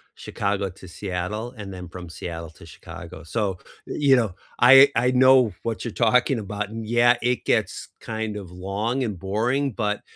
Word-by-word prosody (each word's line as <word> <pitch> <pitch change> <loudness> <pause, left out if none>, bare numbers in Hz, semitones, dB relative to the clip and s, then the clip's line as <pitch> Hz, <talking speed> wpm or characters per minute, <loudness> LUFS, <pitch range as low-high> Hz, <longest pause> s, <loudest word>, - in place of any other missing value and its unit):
Chicago 100 -1 -2
to 95 +1 -14
Seattle, 100 +6 -4
and 100 -2 -8
then 90 -1 -8
from 90 0 -9
Seattle 85 -1 -7
to 80 - -16
Chicago. 80 - -11
So, 95 +3 -2 0.3
you 140 -2 +3
know, 115 -7 0 0.3
I 135 +3 +9
I 125 +2 +2
know 130 -3 +5
what 115 0 -4
you're 120 - -3
talking 125 +2 +2
about, 105 0 -4
and 115 +1 -6
yeah, 120 +2 +3
it 125 +1 -1
gets 110 -5 -1
kind 110 -1 -4
of 95 -4 -8
long 100 +8 -2
and 105 -7 -4
boring, 120 +9 0
but, 105 -1 -2
105 Hz, 170 wpm, -24 LUFS, 95-120 Hz, 0.3 s, I